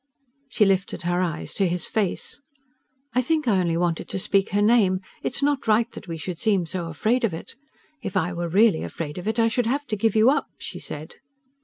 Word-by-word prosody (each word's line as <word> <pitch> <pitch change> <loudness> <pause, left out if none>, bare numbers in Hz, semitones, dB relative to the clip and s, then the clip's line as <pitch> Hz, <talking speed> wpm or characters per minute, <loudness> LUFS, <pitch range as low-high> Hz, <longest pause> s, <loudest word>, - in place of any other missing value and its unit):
She 225 -4 +3
lifted 195 -2 0
her 175 +1 +1
eyes 170 -4 -3
to 195 - +2
his 175 0 -1
face. 210 +5 -2 0.7
"I 255 - +3
think 305 +1 0
I 200 -5 +4
only 170 -2 +1
wanted 170 -1 -1
to - - -3
speak 195 +1 +1
her 205 +1 +1
name. 205 -4 +4 0.2
It's 260 - -2
not 285 -3 +1
right 225 +2 +3
that - - -10
we 165 -1 -4
should 165 +2 -5
seem 200 -5 +2
so 170 +1 -4
afraid 220 - 0
of 200 -8 +1
it. 165 - -9 0.5
If 195 -4 -3
I 180 +2 0
were 170 0 -3
really 200 0 +4
afraid 155 0 -5
of 180 - -7
it 220 +1 0
I 230 -1 +4
should 230 0 0
have 280 +4 0
to 220 - -2
give 225 +2 +1
you 220 +4 +6
up," 295 - 0
she - - -7
said. 155 +2 -8
195 Hz, 220 wpm, -24 LUFS, 175-230 Hz, 0.7 s, you